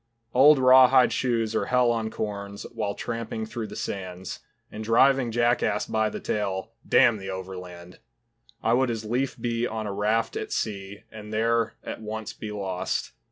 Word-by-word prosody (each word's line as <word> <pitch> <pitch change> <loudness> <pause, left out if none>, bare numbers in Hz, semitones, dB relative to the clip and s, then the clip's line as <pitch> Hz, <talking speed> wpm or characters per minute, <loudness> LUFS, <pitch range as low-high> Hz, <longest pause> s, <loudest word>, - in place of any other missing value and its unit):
Old 145 +4 +7
raw 130 0 +8
hide 130 -1 +4
shoes 115 -3 0
are - - 0
hell 125 -1 +3
on 115 -1 -1
corns 100 -2 -5
While 100 -2 -2
tramping 115 -1 -4
through 110 0 -5
the - - -9
sands, 95 -2 -5 0.3
And 110 - -6
driving 125 +3 +4
jackass 120 -2 +1
by 110 0 0
the - - -6
tail, 100 -1 -2 0.2
Damn 120 -4 +5
the 95 -1 -7
overland! 90 -2 -8 0.6
I 115 - +3
would 130 +1 +3
as 110 -2 -3
leaf 125 +5 -1
be 120 0 -1
on 110 -1 -4
a 100 - -3
raft 110 +3 0
at - - -4
sea 100 -1 -4
And 105 -1 -10
there 115 +1 +1
at - - -6
once 110 0 -5
be 110 - -7
lost. 95 -3 -3
110 Hz, 170 wpm, -26 LUFS, 100-120 Hz, 0.6 s, raw